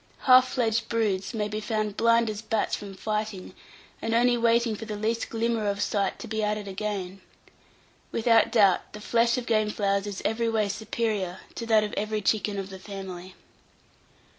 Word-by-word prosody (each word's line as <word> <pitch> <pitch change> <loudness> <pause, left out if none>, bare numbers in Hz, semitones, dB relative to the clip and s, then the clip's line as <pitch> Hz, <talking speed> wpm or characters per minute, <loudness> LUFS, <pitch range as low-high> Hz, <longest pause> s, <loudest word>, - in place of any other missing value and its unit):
Half 255 0 +7
fledged 230 -2 0
broods 205 -4 0
may 215 -3 -2
be 210 +1 -4
found 215 -1 -2
blind 230 0 +3
as 210 -1 -4
bats 220 -1 0
from 200 -2 -8
fighting, 215 -2 -3 0.5
and 225 0 0
only 240 +1 +4
waiting 235 -1 +2
for 225 - -7
the 215 -1 -5
least 225 +2 -1
glimmer 230 -1 -1
of 200 0 -1
sight 200 -1 0
to - - -8
be 220 0 -2
at 210 0 0
it 205 -1 -7
again. 195 -1 -4 0.9
Without 230 -1 +3
doubt, 200 -6 +3
the 210 - -8
flesh 235 +3 +2
of 250 - -3
game 215 -2 +2
fowls 200 -1 0
is 200 -2 -6
every 230 +1 +1
way 215 -2 +1
superior 210 -3 -2
to 230 - -6
that 220 -2 +4
of 210 - -4
every 215 0 -2
chicken 205 0 +1
of 195 0 -5
the 190 - -8
family. 190 -2 -8
215 Hz, 185 wpm, -27 LUFS, 200-230 Hz, 0.9 s, Half